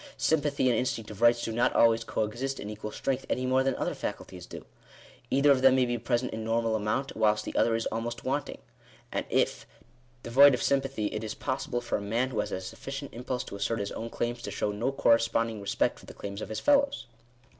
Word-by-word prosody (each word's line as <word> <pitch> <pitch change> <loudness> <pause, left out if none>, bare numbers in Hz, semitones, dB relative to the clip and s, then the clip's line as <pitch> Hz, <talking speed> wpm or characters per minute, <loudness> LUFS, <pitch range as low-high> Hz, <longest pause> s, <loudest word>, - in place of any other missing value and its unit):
Sympathy 145 -4 +1
and 125 - +3
instinct 115 -3 -2
of 105 +1 -10
rights 120 0 +5
do - - -2
not 120 +2 +1
always 115 0 +5
co 110 - -1
exist 125 +6 -3
in 105 - -5
equal 105 0 -6
strength 135 +3 -2
any 130 - 0
more 130 +1 +3
than 135 0 +1
other - - -2
faculties - - -6
do. - - -9 0.6
Either 140 +2 +4
of 130 -2 +4
them 130 0 +6
may 130 -1 +3
be 120 -1 -2
present 120 +2 -1
in 110 - -4
normal 115 0 +1
amount, 110 +6 -1
whilst 105 -1 +2
the - - -6
other 115 - +3
is 115 - -1
almost 115 +1 -4
wanting. - - -2 0.5
And, - - -2
if - - 0 0.6
devoid 135 +3 +7
of 120 - -4
sympathy, 135 -5 0
it 110 0 -3
is 110 - -4
possible 130 -2 -2
for 120 - -2
a - - -8
man 115 +6 -1
who 110 - -2
has 105 - -2
a 95 - -3
sufficient 135 +8 -7
impulse 125 +1 -3
to - - -8
assert 105 +3 -1
his 100 -1 -3
own 115 - -5
claims, 120 +1 -3
to 110 - -5
show 105 +1 -1
no 115 +6 -1
corresponding 115 -3 +2
respect 100 - 0
for - - -16
the - - -11
claims 100 +1 -6
of - - -6
his 110 - -3
fellows. 280 - +2
120 Hz, 225 wpm, -29 LUFS, 110-130 Hz, 0.6 s, devoid